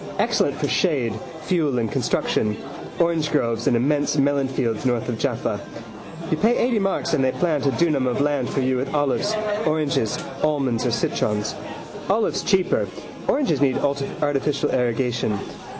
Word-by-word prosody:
Excellent - - +1
for - - -1
shade, 135 - +1 0.3
fuel 155 -7 +1
and 115 -2 -1
construction. 105 0 0 0.4
Orangegroves 150 -9 +1
and 120 - +4
immense 145 +4 +1
melonfields 135 -5 +1
north 120 -3 0
of 115 -2 -3
Jaffa. - - -1 0.7
You 160 - +2
pay 225 +7 +3
eighty 240 -3 +2
marks 195 -4 0
and 140 -4 +3
they 130 - +3
plant 155 -5 0
a - - +3
dunam 150 -6 +2
of 125 - 0
land 145 -3 +1
for 135 - -1
you 130 0 +1
with 135 +4 -2
olives, 145 +9 +1 0.3
oranges, 150 -8 +1 0.2
almonds 135 -6 +1
or - - +1
citrons. 105 -2 0 0.6
Olives 215 +3 +1
cheaper: 190 -3 +2 0.4
oranges 255 - +1
need 135 -2 +3
artificial 140 0 0
irrigation. 120 -3 0
140 Hz, 145 wpm, -23 LUFS, 125-155 Hz, 0.7 s, and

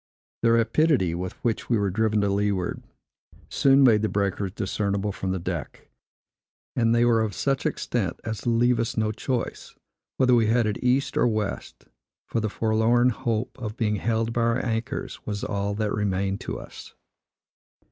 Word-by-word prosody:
The 115 - +4
rapidity 115 - +3
with 90 +2 -4
which 115 -3 -1
we 120 - +3
were 100 -2 0
driven 110 +1 +1
to 100 - +1
leeward, 100 -2 -1 0.7
soon 135 0 +4
made 110 -5 +5
the 110 - 0
breakers 100 -1 -1
discernible 100 0 -1
from 95 -1 -3
deck; 85 -4 -5 0.9
and 115 -1 +3
they 120 0 +4
were 115 -2 +3
of 105 -4 -2
such 135 -1 0
extent, 100 -8 -2
as 110 -1 -4
to - - -1
leave 120 +1 +3
us 115 0 -2
no 110 -1 +1
choice, 120 +2 -4 0.4
whether 125 -1 +4
we 115 -2 +4
headed 110 -2 +1
east 130 +2 +1
or - - +4
west; 110 -3 -3 0.4
for 115 - -2
the 110 -1 -1
forlorn 115 +3 +2
hope 115 -1 -2
of 110 -2 -5
being 105 -2 0
held 115 +2 -1
by 120 - 0
our 115 +2 +1
anchors 115 -1 -3
was 100 -1 -3
all 100 0 -2
that 105 -1 -1
remained 100 -1 -1
to - - -4
us. - - -12
110 Hz, 165 wpm, -25 LUFS, 100-120 Hz, 0.9 s, made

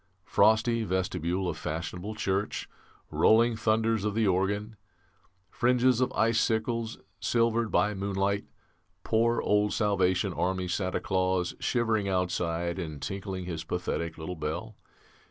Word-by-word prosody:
"Frosty 110 +2 +3
vestibule 90 -1 -1
of 80 -3 -3
fashionable 90 +6 -4
church, 100 0 -2 0.4
rolling 115 +1 +4
thunders 110 -1 +1
of 105 -1 -1
the 115 -1 +2
organ, 100 +3 0 0.8
fringes 125 0 +3
of 130 - +1
icicles 115 0 +1 0.2
silvered 115 -1 +1
by 105 0 +2
moonlight, 100 0 -1 0.6
poor 115 +1 +2
old 105 0 +2
Salvation 95 -2 +1
Army 95 +1 -1
Santa 90 +1 -1
Claus 95 -2 0
shivering 110 -5 0
outside 85 -1 -1
and 80 -5 -5
tinkling 95 +1 -5
his 80 -3 -4
pathetic 85 -1 -3
little 80 +3 -5
bell. 85 +8 -4
100 Hz, 120 wpm, -28 LUFS, 90-110 Hz, 0.8 s, rolling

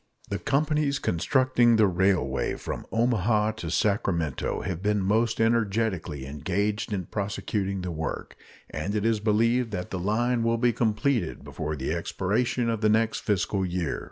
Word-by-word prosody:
The 100 - -1
companies 145 0 +1
constructing 125 - +2
the 110 -1 +5
railway 90 -7 +1
from - - -6
Omaha 110 -2 +2
to 85 -7 -5
Sacramento 85 - 0
have 90 -2 -4
been 105 +1 +1
most 110 +4 +1
energetically 105 - 0
engaged 100 - -2
in 95 -4 -2
prosecuting 100 -1 -2
the 90 -1 -4
work, 80 0 -4 0.4
and 90 +8 -3
it 105 0 0
is 115 -2 +2
believed 115 +3 +2
that 90 -1 -4
the 95 - -3
line 115 +6 +1
will 115 0 +1
be 120 0 +2
completed 110 - 0
before 75 0 -4
the 70 +2 -2
expiration 110 +8 -1
of 115 -2 -1
the 110 - +3
next 110 +1 +2
fiscal 100 -1 0
year. 90 -3 -2
105 Hz, 155 wpm, -26 LUFS, 90-115 Hz, 0.4 s, the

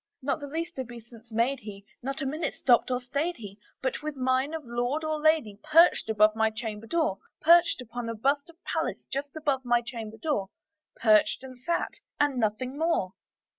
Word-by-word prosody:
Not 275 +1 0
the 285 - -6
least 330 +1 -4
obeisance 235 -2 -9
made 240 +5 +1
he; 205 -3 -10 0.2
not 275 +3 -3
a - - -2
minute 310 +5 -2
stopped 245 -1 +3
or 250 -1 +1
stayed 285 +8 -2
he; 205 -3 -10 0.2
But, 260 - -1
with 305 -1 -4
mien 260 +2 +1
of 320 - -5
lord 245 +6 -1
or 310 -1 -1
lady, 305 -10 +2
perched 315 -5 +5
above 215 0 +4
my 220 0 +3
chamber 220 -1 -6
door 315 - 0 0.2
Perched 335 -4 +5
upon 240 0 -5
a 230 - -3
bust 280 +7 0
of 335 - -15
Pallas - - -2
just 280 +1 -3
above 280 -4 0
my 240 -1 +2
chamber 225 -2 -7
door 220 -7 -1 0.5
Perched, 215 +2 +4
and 255 -1 -10
sat, 340 +7 -1 0.3
and 290 -2 +2
nothing 250 +6 -1
more. 320 - +1
255 Hz, 185 wpm, -28 LUFS, 225-295 Hz, 0.5 s, perched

